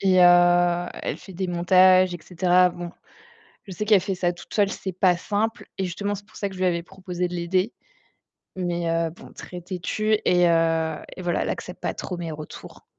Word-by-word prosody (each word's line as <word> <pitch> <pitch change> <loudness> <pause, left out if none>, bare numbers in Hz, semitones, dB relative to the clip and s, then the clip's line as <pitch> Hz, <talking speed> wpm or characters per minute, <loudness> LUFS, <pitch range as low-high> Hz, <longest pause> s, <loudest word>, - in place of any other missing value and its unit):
et 185 -1 +3
heu, 175 0 +5 0.2
elle - - -2
fait 190 - -13
des 185 +1 -3
montages 185 +1 +5
et 175 - -5
cetera. 180 +1 +3
Bon, 175 0 -7 0.8
je - - -8
sais 210 +4 -4
qu'elle 210 -4 +5
fait 195 0 -2
ça 175 -1 0
toute 175 - -14
seule, 205 -2 +2
c'est 190 -2 -5
pas 180 -1 +3
simple 215 +5 -2
et 190 - -1
justement, 200 +3 -3
c'est 205 - -11
pour 215 - -16
ça 200 - -2
que 190 - -11
je - - -10
lui 185 - +1
avais 170 -1 +1
proposé 180 -1 -4
de 180 - -6
l'aider 185 +5 0 0.9
mais 175 -2 -1
heu, 165 0 +1
bon, 170 - -14
très 180 -1 -9
têtue 210 +4 -1
et 180 -1 +4
heu 165 -1 +2 0.2
et 185 - -7
voilà, 175 -1 0
elle - - -2
accepte - - -5
pas - - -2
trop 180 - -5
mes 165 -2 -5
retours. 155 0 -10
180 Hz, 215 wpm, -24 LUFS, 175-190 Hz, 0.9 s, heu